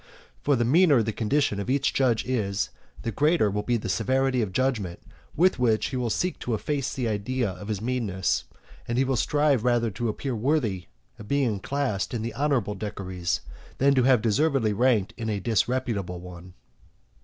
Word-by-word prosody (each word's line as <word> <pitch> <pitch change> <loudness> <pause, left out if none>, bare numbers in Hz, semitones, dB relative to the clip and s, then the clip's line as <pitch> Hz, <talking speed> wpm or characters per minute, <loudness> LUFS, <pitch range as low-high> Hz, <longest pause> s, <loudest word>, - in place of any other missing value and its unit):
For 145 - +2
the 120 -1 +1
meaner 145 -2 +5
the 110 - -1
condition 115 -1 0
of 100 - -4
each 140 +1 +1
judge 125 -5 +2
is, 105 -6 -1 0.3
the 115 - -2
greater 150 - +2
will 105 +1 -1
be 120 +3 0
the 105 - -5
severity 130 +2 +1
of 105 -4 -2
judgment 105 -6 -1 0.4
with 180 -2 +3
which 115 -3 +2
he 135 - -5
will 125 -2 -1
seek 180 +10 -1
to 120 - -1
efface 140 +3 -2
the 125 -4 -2
idea 110 +1 -1
of 100 +2 -9
his 105 -1 -3
meanness; 95 - -1 0.4
and 120 - -1
he 130 - +4
will 135 0 0
strive 145 -1 +2
rather 120 -2 +2
to 115 +4 -2
appear 130 +4 -3
worthy 110 - 0 0.3
of 105 - -10
being 130 -7 +1
classed 125 -3 -2
in 110 - -2
the 115 -1 -4
honourable 135 -8 0
decuries, 95 -4 -3 0.4
than 140 +1 +4
to 130 - +3
have 125 -3 +4
deservedly 125 -1 +2
ranked 110 -3 +2
in 115 -1 -3
a 105 -2 -1
disreputable 110 -4 -1
one. 90 0 -11
120 Hz, 185 wpm, -26 LUFS, 105-135 Hz, 0.4 s, meaner